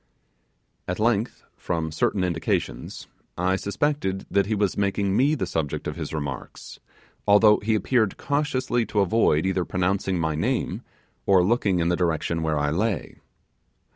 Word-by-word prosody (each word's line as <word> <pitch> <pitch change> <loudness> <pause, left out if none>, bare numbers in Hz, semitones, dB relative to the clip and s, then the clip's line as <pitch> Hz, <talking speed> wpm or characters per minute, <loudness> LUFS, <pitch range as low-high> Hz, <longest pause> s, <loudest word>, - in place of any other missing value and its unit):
At 90 - -2
length, 115 +1 0
from 80 -2 -3
certain 90 +4 0
indications, 85 -3 -2 0.3
I 90 +2 +1
suspected 100 -1 -1
that 100 -1 +2
he 110 - 0
was 100 -2 0
making 100 -1 0
me 140 +7 +3
the 110 - -2
subject 80 -4 -3
of 75 - -4
his 80 -3 -5
remarks, 70 -4 -6 0.5
although 105 +1 +6
he 110 +1 0
appeared 110 -1 +1
cautiously 135 -4 0
to 105 - +1
avoid 95 -6 +2
either 95 -1 +1
pronouncing 95 +1 -1
my 80 -2 0
name, 75 - -1 0.5
or 95 -2 +5
looking 100 -2 +2
in 85 0 +1
the 90 - +2
direction 85 -1 -1
where 80 -1 0
I 75 0 0
lay. 100 +5 -2
95 Hz, 150 wpm, -24 LUFS, 85-110 Hz, 0.5 s, although